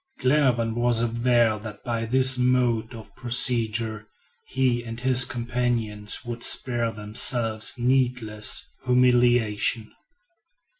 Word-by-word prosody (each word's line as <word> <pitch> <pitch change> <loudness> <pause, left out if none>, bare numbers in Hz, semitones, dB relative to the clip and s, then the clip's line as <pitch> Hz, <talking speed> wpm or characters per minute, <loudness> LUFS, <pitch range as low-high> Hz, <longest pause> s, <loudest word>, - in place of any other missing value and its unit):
Glenarvan 125 -5 +1
was 120 0 0
aware 115 -1 +1
that 105 -1 -10
by 115 -2 -3
this 130 +3 +3
mode 125 -2 0
of 110 -2 -13
procedure, 115 -3 0 0.4
he 125 -2 -1
and 115 0 -8
his 130 0 +3
companions 120 -2 -3
would 120 0 -7
spare 120 -2 +1
themselves 110 +1 0
needless 125 -4 0 0.2
humiliation. 120 -3 +1
120 Hz, 100 wpm, -24 LUFS, 110-125 Hz, 0.4 s, this